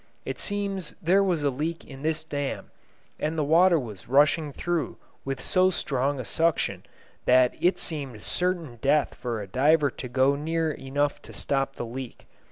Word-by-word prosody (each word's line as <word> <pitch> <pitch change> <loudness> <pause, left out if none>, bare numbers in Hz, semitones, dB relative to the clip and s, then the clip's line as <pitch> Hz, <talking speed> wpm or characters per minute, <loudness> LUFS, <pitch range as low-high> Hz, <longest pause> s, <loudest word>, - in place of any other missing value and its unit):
It - - -4
seems 200 -4 -3
there 185 +4 +4
was 175 -6 0
a 140 - +2
leak 155 +6 -3
in 135 -1 -11
this 160 +1 -1
dam, 145 -3 -4 0.5
and 155 +2 -1
the 155 - +2
water 170 +4 +5
was 110 - -6
rushing 145 +3 +4
through 175 +2 -2 0.3
with 135 -1 -3
so 185 0 +3
strong 140 -5 -1
a 125 - -4
suction 165 +4 0 0.4
that 125 0 +5
it 180 +2 +3
seemed 135 -9 -5
certain 175 -9 -1
death 145 +1 +2
for 120 -4 -4
a - - -9
diver 145 +6 +3
to 125 - -7
go 130 +3 +3
near 160 +2 -1
enough 145 +1 -1
to - - -13
stop 135 -1 -1
the - - -4
leak. 125 +1 -7
145 Hz, 175 wpm, -26 LUFS, 135-165 Hz, 0.5 s, water